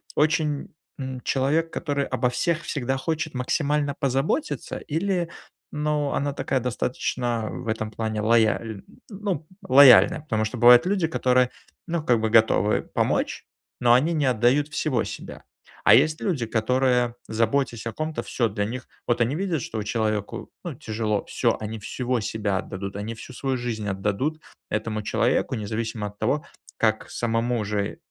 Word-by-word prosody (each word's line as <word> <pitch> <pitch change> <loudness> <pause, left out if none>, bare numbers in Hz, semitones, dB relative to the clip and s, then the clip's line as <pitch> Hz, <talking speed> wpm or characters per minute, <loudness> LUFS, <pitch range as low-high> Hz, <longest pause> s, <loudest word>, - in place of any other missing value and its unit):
очень, 150 -1 +1 0.2
м, 130 -2 -5
человек, 150 +6 +1
который 145 -3 -1
обо 125 -1 0
всех 170 +4 0
всегда 135 -2 -2
хочет 155 +1 -3
максимально 145 +3 0
позаботиться 140 - -1
или, 175 +2 -1 0.4
ну, 150 -1 -1
она 145 0 -1
такая 135 -1 -1
достаточно 120 -1 -2
в - - -7
этом 110 -1 -2
плане 110 -1 -2
лояль 110 -1 +2 0.3
ну, 200 -5 -3 0.2
лояльная, 130 -5 +7
потому 110 -7 -1
что 110 +3 -4
бывают 120 +5 +8
люди 190 -3 +1
которые, 125 -5 +2 0.4
ну, 170 -2 -2
как 120 -6 +3
бы 110 0 0
готовы 110 -2 +4
помочь, - - -1 0.3
но 120 -1 +5
они 145 +8 +3
не 150 -3 +1
отдают 130 +4 +3
всего 130 -6 0
себя. - - -8 0.4
А - - +8
есть 155 0 +3
люди, 150 - 0
которые, 125 +2 +1
заботясь 115 +1 0
о - - -2
ком-то, 155 0 -3
всё 120 - 0
для 105 0 -2
них 125 +4 -6 0.2
Вот 120 0 +1
они 120 +5 +1
видят, 175 -4 -1
что 110 -1 -4
человеку, 110 -1 -2
ну, - - -5
тяжело, 110 -1 -2
всё, - - 0
они 110 +1 -5
всего 125 +3 -2
себя 105 -2 -1
отдадут, 100 0 -5
они 105 +3 -4
всю 120 - -10
свою 130 +1 -2
жизнь 115 -4 -3
отдадут 105 +11 -1 0.3
этому 110 0 -2
человеку, - - +1
независимо 110 0 -3
от 105 0 -12
того, 140 +7 0 0.3
как 110 -1 +1
самому 115 0 0
же, 100 -1 -2
125 Hz, 155 wpm, -25 LUFS, 110-145 Hz, 0.4 s, бывают